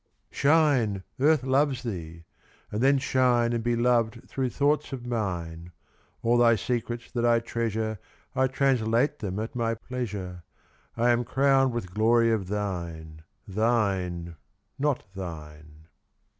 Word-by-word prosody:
Shine, 140 -10 +2 0.2
Earth 150 0 +4
loves 135 0 +1
thee! 85 -7 -6 0.5
And 105 - -2
then 135 +2 +5
shine 125 -3 +2
And 115 -1 -1
be 120 0 +1
loved 120 0 +1
through 130 -2 -2
thoughts 145 +5 +1
of 125 -2 -6
mine. 90 -7 -3 0.5
All 120 +1 +3
thy 115 -1 +6
secrets 120 +2 -3
that 120 -2 -1
I 120 -1 +4
treasure 110 -2 -2 0.4
I 130 0 +3
translate 130 0 +1
them 95 -3 -4
at 110 +2 -4
my 115 -1 0
pleasure. 105 -8 -5 0.5
I 120 +1 +3
am 120 0 +2
crowned 135 +1 +3
with 110 -7 -5
glory 115 +2 +3
of 105 -5 -1
thine. 85 -6 -4 0.3
Thine, 95 -6 0 0.4
not 145 -2 0
thine. 75 -4 -9
115 Hz, 130 wpm, -27 LUFS, 95-125 Hz, 0.5 s, thy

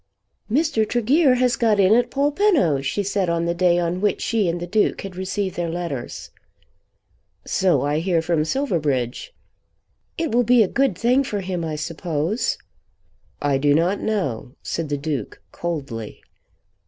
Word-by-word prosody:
"Mr. 290 -3 +2
Tregear 255 +4 +3
has 250 -1 +2
got 220 -3 +2
in 195 +1 +5
at 240 +1 +3
Polpenno," 285 - +2
she 140 +9 -1
said 195 -2 0
on 170 0 0
the 170 - 0
day 175 0 +3
on 175 +1 -1
which 210 - +1
she 215 -6 0
and 170 +1 -2
the 175 - -4
Duke 210 +4 +1
had 195 -2 -8
received 190 0 -3
their 170 -1 -2
letters. 165 -7 -5 1.1
"So 180 -9 +2
I 145 +2 0
hear 170 0 +1
from 165 -2 +1
Silverbridge." 155 - -1 0.9
"It 330 -2 -1
will 240 +2 +3
be 240 0 +5
a - - 0
good 265 -4 +1
thing 250 +5 +3
for 210 -6 -3
him, 180 -2 -3
I 160 -1 -3
suppose." 165 +5 -2 0.9
"I 140 -2 +2
do 145 +1 +3
not 175 +5 +1
know," 160 - -2
said 165 -3 -3
the 145 - -1
Duke 140 -5 -4
coldly. 135 -10 -5
180 Hz, 160 wpm, -22 LUFS, 160-225 Hz, 1.1 s, in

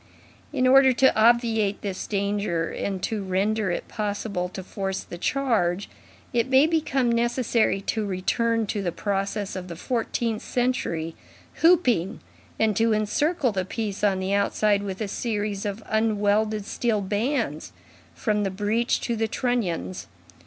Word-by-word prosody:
In 260 -4 +1
order 265 0 +6
to 265 +2 +4
obviate 225 -2 +3
this 195 -2 -4
danger, 200 -4 -1
and 190 -2 -3
to 215 0 -1
render 200 +2 0
it 175 - -3
possible 205 -4 -3
to 190 +1 -7
force 195 0 -3
the 175 - -9
charge, 205 -8 0 0.4
it 240 +2 +1
may 265 +2 +6
become 275 -6 +1
necessary 235 -3 +1
to 220 +2 -1
return 225 +4 0
to 205 0 -2
the 180 -3 -1
process 200 +1 -2
of 185 -1 -5
the 170 - -7
fourteenth 230 +2 -2
century, 170 -10 -1 0.5
hooping, 260 - +3 0.4
and 220 -2 +2
to 225 -1 +3
encircle 260 - +1
the 190 -2 -1
piece 205 +1 -4
on 200 -2 +3
the 190 +1 -1
outside 200 0 +2
with 195 0 -5
a 215 - -1
series 205 -2 -2
of 205 +2 -5
unwelded 215 -1 +1
steel 220 -1 0
bands, 210 - -1 0.4
from 210 - 0
the 200 - 0
breech 210 +5 0
to 235 - -1
the 225 0 0
trunnions. 205 - -2
210 Hz, 145 wpm, -25 LUFS, 195-235 Hz, 0.5 s, order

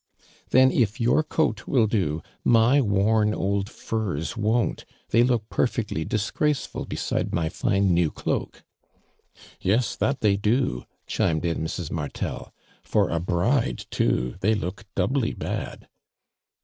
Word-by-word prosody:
"Then 130 +1 +6
if 115 0 +1
your 120 +6 +3
coat 150 -9 -1
will 125 -5 +3
do 85 -8 -1 0.2
my 120 +5 +5
worn 105 0 +2
old 100 +1 -1
fui 110 -12 -3
s 85 +9 -4
won't. 115 +1 0 0.3
They 115 - +4
look 120 -3 +1
perfectly 110 -10 -1
dis 105 -2 -1
graceful 150 -2 -1
beside - - -2
my 80 -2 0
fine 95 +1 +1
new 85 -2 +3
cloak." - - -3 0.5
" - - -24 0.2
Yes, 110 +6 +1
that 135 0 -1
they 100 -2 +3
do," 105 - 0 0.2
chimed 80 0 0
in 85 -1 -1
Mrs. 80 0 -4
Martel. 75 -3 -4 0.3
For - - +1
a 85 - 0
bride 90 - 0
too 60 0 0
they 105 +4 +2
look 100 0 -5
doubly 130 -3 0
bad." - - -5
105 Hz, 140 wpm, -25 LUFS, 90-120 Hz, 0.5 s, Then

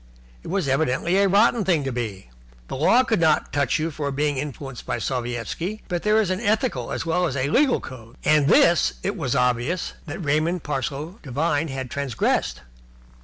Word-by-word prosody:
It - - -12
was 185 -3 -1
evidently 140 +5 +1
a 200 0 +4
rotten 215 +3 +4
thing 170 -6 +2
to 135 - -2
be. 105 - -5 0.4
The - - -4
law 200 - +4
could 225 -5 0
not 160 -2 +2
touch 140 -3 +1
you 160 +1 -2
for 145 -1 -3
being 145 +1 0
influenced 135 -2 -6
by - - -2
Sovietski, 125 - -3
but 175 -2 -2
there 215 +1 +3
is 200 -4 +1
an 185 - -1
ethical 205 - 0
as - - -3
well 175 +2 +1
as 140 - -4
a 140 +2 -1
legal 270 - +3
code, 115 -2 -11
and 150 -2 +4
this 170 +2 +4
it - - -1
was 125 - -2
obvious 125 +7 0
that 145 - -5
Raymond 155 +4 +1
Parsloe 150 - -4
Devine 145 +3 -1
had 135 -3 -5
transgressed. 140 -5 -1
150 Hz, 185 wpm, -23 LUFS, 130-180 Hz, 0.4 s, a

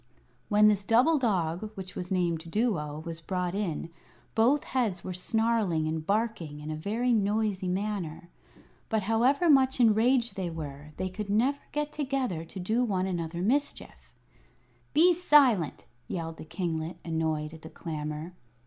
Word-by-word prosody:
When 210 0 +6
this 205 -2 +3
double 250 +10 +4
dog, 185 -4 0
which 185 -1 -7
was 180 0 -5
named 170 -3 -1
Duo, 160 -8 -1
was 165 -1 -6
brought 180 +1 -2
in, 170 -5 -3 0.4
both 255 +6 +3
heads 225 -9 -1
were 185 - -4
snarling 205 -4 +1
and 160 0 -2
barking 200 -6 -1
in 150 +1 -6
a - - -2
very 225 +10 0
noisy 205 -2 +1
manner. 185 -3 -3 0.6
But 220 -3 +1
however 245 - +3
much 265 -3 +5
enraged 235 +2 +4
they 185 -3 -2
were, 150 -2 -7
they 185 - -2
could 210 +2 -5
never 250 +8 +2
get 295 0 -2
together 265 - -2
to 165 +4 -8
do 220 +7 +1
one 190 -6 0
another 170 -2 -3
mischief. 280 +8 -2 0.9
"Be 350 +4 +6
silent!" 280 - +4 0.2
yelled 165 -2 -4
the - - -9
kinglet, 165 0 -3
annoyed 160 -2 -1
at 160 - -11
the 160 - -9
clamor. 155 +1 -5
190 Hz, 150 wpm, -29 LUFS, 165-230 Hz, 0.9 s, When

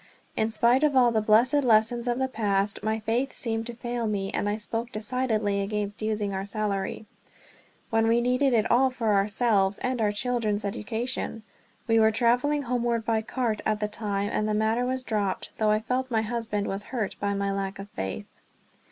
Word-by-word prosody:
In 220 - +1
spite 235 +5 +3
of 295 -2 +3
all 245 -2 +5
the 220 -1 +1
blessed 240 +7 +4
lessons 235 +1 +3
of 240 0 +1
the 265 0 0
past, 200 -4 -1
my 220 0 -1
faith 235 +5 -1
seemed 225 -1 -3
to 240 - -6
fail 240 -1 -3
me; 195 -2 -2
and 205 - 0
I 210 - -1
spoke 225 +2 -3
decidedly 215 -2 -1
against 205 +1 -3
using 210 -2 -1
our 190 0 -2
salary, 200 0 -3 0.9
when 225 0 +3
we 230 +1 +4
needed 250 +3 +2
it 225 -3 +2
all 260 +2 +5
for 230 -4 0
ourselves 205 -1 +2
and 255 -2 -1
our 210 -1 +2
children's 215 -2 -1
education. 225 +2 -3 0.4
We 225 -1 +4
were 220 0 +6
traveling 250 +6 +2
homeward 240 -2 -1
by 225 -1 +1
cart 225 -1 -2
at 215 -1 0
the 210 - 0
time 205 -1 -2
and 215 - 0
the 210 - +1
matter 220 +3 +1
was 260 0 -1
dropped; 205 -5 -2
though 215 -1 +3
I 215 0 +3
felt 255 +4 -2
my 220 -2 +1
husband 220 -2 -2
was 195 +1 -3
hurt 230 -6 -2
by 200 0 -1
my 200 0 -1
lack 195 0 -3
of 195 - -8
faith. 95 - -5
220 Hz, 195 wpm, -27 LUFS, 210-240 Hz, 0.9 s, were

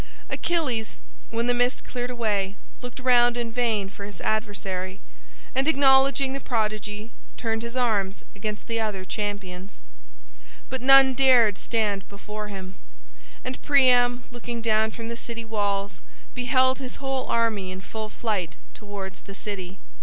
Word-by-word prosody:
Achilles, 265 -10 -1 0.3
when 230 0 -1
the 245 - +3
mist 245 +1 +1
cleared 245 -1 -4
away, 210 -5 -1 0.3
looked 245 +1 -7
round 245 -1 +5
in 235 -1 -2
vain 225 -4 +1
for 200 +1 -9
his 200 -4 -8
adversary, 195 -3 -2 0.5
and 265 +2 +2
acknowledging 270 -2 +5
the 275 - -2
prodigy, 215 -2 -2 0.3
turned 225 -1 -1
his 235 +1 -6
arms 210 -6 0
against 210 +2 -5
other 215 -4 -1
champions. 200 -2 -5 0.9
But 260 -1 -2
none 270 0 +8
dared 245 -6 +5
stand 210 -4 0
before 210 +1 -7
him, 190 -2 -8 0.7
and 255 0 -5
Priam 250 -3 +5
looking 240 -1 -5
down 220 -1 +2
from 230 +1 -7
the 235 - -4
city 230 -1 -6
walls 205 -2 -1 0.3
beheld 260 +1 +3
his 260 -2 -6
whole 270 -1 -2
army 225 -5 +1
in 185 0 -6
full 215 +2 -6
flight 210 -7 -2 0.2
towards 195 -2 -7
the 195 - -10
city. 195 -3 -5
225 Hz, 140 wpm, -26 LUFS, 205-250 Hz, 0.9 s, none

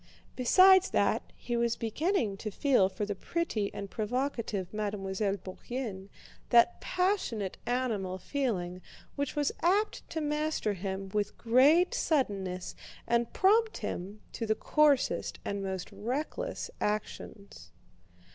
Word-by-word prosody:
Besides 370 +9 +6
that, - - +2
he 240 - -4
was 235 0 +1
beginning 235 - 0
to 215 - -4
feel 230 -3 +3
for 195 +2 -3
the 205 - -2
pretty 215 - -2
and 200 - -6
provocative 220 -4 -2
Mademoiselle 200 -1 -2
Bourienne 195 +1 -6 0.4
that 240 +8 +5
passionate 360 - -1
animal 225 -7 -1
feeling 185 -7 -2 0.3
which 285 -1 -2
was 295 -1 +1
apt 400 +5 +1
to 320 - -3
master 300 -7 -1
him 190 0 -4
with 205 +1 -2
great 285 - +4
suddenness 200 - -1 0.3
and 235 0 +1
prompt 440 +3 +3
him 200 +4 -5
to 225 - -4
the 215 - +2
coarsest 295 0 +2
and 200 0 -2
most 190 -2 -4
reckless 285 - -4
actions. 200 - -4
230 Hz, 120 wpm, -30 LUFS, 195-290 Hz, 0.4 s, Besides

